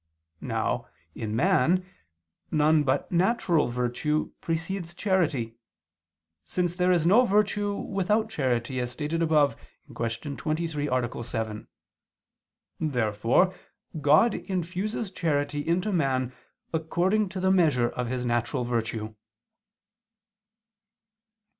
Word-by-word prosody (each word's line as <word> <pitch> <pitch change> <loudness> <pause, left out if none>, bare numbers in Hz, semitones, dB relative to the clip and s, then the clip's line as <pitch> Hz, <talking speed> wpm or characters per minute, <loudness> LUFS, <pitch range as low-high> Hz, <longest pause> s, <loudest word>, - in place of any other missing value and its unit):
Now, - - -2 0.3
in 110 -1 -4
man, 170 +10 +3 0.6
none 155 0 +4
but 135 -1 0
natural 175 -3 +2
virtue 125 +5 -1
precedes 170 +1 -3
charity, 150 - 0 0.9
since 175 -1 -1
there 180 0 +2
is 170 -3 +2
no 210 +8 +6
virtue 205 -2 +1
without 210 +3 0
charity, 130 - -1
as 125 -1 -2
stated 150 +5 -3
above 150 -6 +3 0.4
(Q. 115 +5 -3
23, 155 -1 -2
A. 125 -1 -1
7). 110 -2 -4 1.1
Therefore 125 - +2 0.5
God 155 +11 +5
infuses 190 +3 -3
charity 145 -5 -1
into 180 +5 +1
man 130 -7 0 0.4
according 180 +6 +1
to 185 0 -5
the 190 +1 +2
measure 150 -10 +3
of 125 -1 -3
his 125 0 -2
natural 120 +1 0
virtue. 115 -2 -2
155 Hz, 105 wpm, -27 LUFS, 125-185 Hz, 1.1 s, no